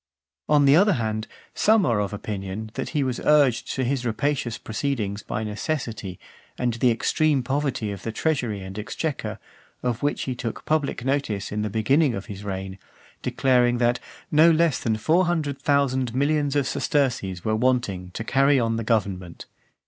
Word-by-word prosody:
On 145 -2 +5
the 140 +1 +6
other 200 +4 +5
hand, 110 -5 -2 0.3
some 215 -1 +4
are 115 -4 +2
of 100 -1 -1
opinion, 105 +1 -5
that - - -4
he 150 -3 0
was 130 -3 -2
urged 145 -5 +3
to 130 - 0
his 130 0 -1
rapacious 120 0 -1
proceedings 110 -4 -3
by 110 - -4
necessity, 110 - -4 0.4
and 120 -1 0
the 120 +2 +2
extreme 140 +4 +1
poverty 130 -5 -1
of 100 -2 -7
the 115 - -4
treasury 120 -6 -1
and 95 +2 -7
exchequer, 145 +7 -3 0.5
of 120 -2 -1
which 145 0 0
he 130 - -2
took 120 -2 -5
public 145 -5 0
notice 135 -8 -1
in 105 +1 -2
the 105 - -1
beginning 130 +6 +2
of 100 - -5
his 100 0 -8
reign; 95 -1 -5 0.4
declaring 125 -2 +2
that 120 0 +2 0.3
"no 155 +2 +6
less 165 -3 +3
than 110 -2 0
four 165 +12 +3
hundred 155 -5 -1
thousand 130 -4 +1
millions 145 +1 +1
of 140 -2 +2
sesterces 120 - -1
were 110 0 +1
wanting 110 -7 0
to - - -3
carry 135 +3 +3
on 115 -1 0
the 115 - -2
government." 95 -6 -2
125 Hz, 170 wpm, -24 LUFS, 110-140 Hz, 0.5 s, the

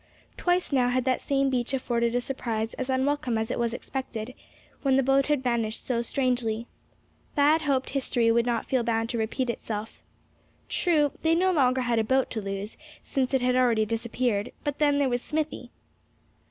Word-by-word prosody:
Twice 355 -1 0
now 250 -3 +3
had 255 0 0
that 260 -1 +1
same 275 -1 +1
beach 250 +1 0
afforded 235 -2 0
a 245 - +2
surprise 230 -4 -3
as 260 0 -4
unwelcome 260 -2 0
as 220 0 -2
it - - -2
was 235 -1 +1
unexpected, 245 -1 -5 0.5
when 270 -2 +3
the 270 - +3
boat 270 +1 +3
had 295 -3 +1
vanished 230 -3 -1
so 235 -2 0
strangely. 235 -3 -1 0.7
Thad 300 +3 +4
hoped 275 -3 0
history 245 -4 +1
would 235 +1 +2
not 235 -2 0
feel 260 -2 +1
bound 225 -1 0
to 235 - -2
repeat 230 +4 -1
itself. 220 -1 -6 0.7
True, 305 -5 +2
they 325 0 +3
no 370 +2 +3
longer 260 -6 +3
had 240 -2 +1
a - - +2
boat 260 +4 +1
to 220 - -3
lose, 195 +1 -5 0.3
since 265 -1 0
it 265 - +2
had 250 0 +2
already 235 -4 +3
disappeared; 230 -1 -1
but 290 -1 -3
then, 290 -1 +3
there 285 -1 +2
was 245 -1 0
Smithy! 310 +2 -3
250 Hz, 185 wpm, -27 LUFS, 230-275 Hz, 0.7 s, Thad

